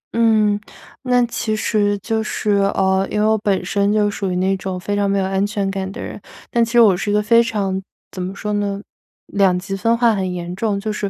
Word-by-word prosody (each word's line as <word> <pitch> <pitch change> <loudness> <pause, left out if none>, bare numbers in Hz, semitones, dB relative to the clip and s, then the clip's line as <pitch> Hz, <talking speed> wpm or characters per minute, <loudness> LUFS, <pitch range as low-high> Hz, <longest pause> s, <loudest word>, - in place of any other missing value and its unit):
嗯， 215 -3 +3 0.4
那 250 -2 +2
其 225 -2 -2
实 205 -1 +1
就 220 +3 -2
是， 215 -1 -2 0.2
呃， 190 0 +2
因 210 - -1
为 210 - +2
我 220 0 +4
本 195 -3 0
身 200 +1 +1
就 210 -1 +2
属 195 -2 -3
于 - - -2
那 190 +1 +1
种 185 -1 -4
非 205 +3 -3
常 200 -1 +1
没 200 - +1
有 190 - +1
安 195 +1 0
全 205 -2 -2
感 190 -1 -4
的 - - -9
人， - - -7 0.3
但 235 -1 +3
其 230 +1 -3
实 240 - +5
我 200 -5 +6
是 200 +3 -3
一 - - +1
个 210 - +3
非 230 +2 +5
常 195 -4 -2 0.3
怎 185 - -6
么 185 +2 -4
说 210 +1 -3
呢， 200 -1 -1 0.5
两 195 -3 +2
极 195 +2 -4
分 230 +4 +1
化 235 -2 +4
很 190 -2 -2
严 175 0 -5
重。 205 -1 -1
就 215 +1 -3
是， 205 -1 -3
205 Hz, 260 characters per minute, -19 LUFS, 190-215 Hz, 0.5 s, 我